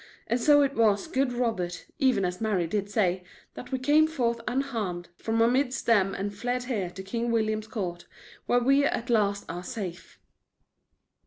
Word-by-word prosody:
And 235 +1 -1
so 290 +1 +6
it 275 0 0
was, 210 -5 +2
good 265 -1 0
Robert, 225 -8 -2
even 260 -9 +3
as 180 +2 -3
Mary 205 -6 +1
did 200 +4 -2
say, 185 -3 +1 0.3
that - - -10
we 260 - 0
came 295 +4 +4
forth 235 -7 -1
unharmed, 225 -10 -2
from 225 +4 0
amidst 255 +2 +1
them 200 -4 +3
and 200 +1 -3
fled 245 +4 -2
here 220 -8 -2
to 190 +2 -9
King 235 +4 -2
William's 215 -1 0
court, 180 -7 -5 0.4
where 245 0 +3
we 275 +3 +4
at 240 -4 -1
last 205 -3 +1
are 175 +2 -5
safe." 190 -6 -7
225 Hz, 170 wpm, -27 LUFS, 195-250 Hz, 0.4 s, so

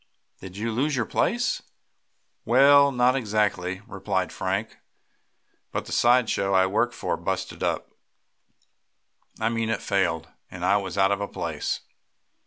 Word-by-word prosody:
Did 95 0 -10
you 115 +2 -2
lose 140 +6 0
your 120 -3 0
place?" 240 - 0 0.8
"Well, 140 +4 +6
no, 125 - -8
not 125 +1 +4
exactly," 105 -6 -1
replied 95 -4 -2
Frank, 95 +4 -3 0.9
"but - - -3
the - - -10
side 120 0 +4
show 100 -2 0
I 95 0 +5
worked 120 +5 0
for - - -2
busted - - -4
up - - -2 1.5
I 110 - +1
mean 115 -1 -1
it 115 - 0
failed, 90 -5 0 0.2
and - - -5
I 100 - +4
was 100 -1 -5
out 95 0 +4
of 100 0 0
a 100 - -2
place. - - -3
105 Hz, 150 wpm, -25 LUFS, 95-120 Hz, 1.5 s, Well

